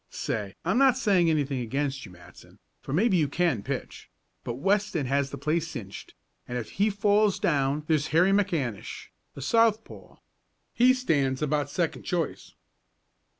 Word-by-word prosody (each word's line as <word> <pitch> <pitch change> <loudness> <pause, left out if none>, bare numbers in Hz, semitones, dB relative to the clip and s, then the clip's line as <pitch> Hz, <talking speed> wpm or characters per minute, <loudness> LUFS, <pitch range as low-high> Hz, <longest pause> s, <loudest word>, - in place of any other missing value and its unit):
Say, 100 -3 -4
I'm 190 +9 +2
not 265 -2 +5
saying 190 -9 +3
anything 145 -4 0
against 135 +1 -3
you, - - -14
Matson, 90 -1 -16 0.2
for - - -8
maybe 190 - +3
you 155 -3 +2
can 160 - 0
pitch, - - -6 0.3
but 120 - -4
Weston 195 +1 0
has 140 +1 0
the 140 - -7
place 155 +4 -1
cinched, 110 -11 -9 0.3
and 125 - -4
if 120 - -6
he 205 +2 +1
falls 205 0 +2
down 140 -1 0
there's 155 -1 +1
Harry 170 +5 +3
McAnish, 165 - -2 0.3
a 140 - -8
southpaw. 225 - 0 0.6
He 255 +2 +5
stands 145 - 0
about 145 -1 0
second 170 +1 -2
choice." 170 -4 -3
155 Hz, 150 wpm, -27 LUFS, 135-200 Hz, 0.6 s, not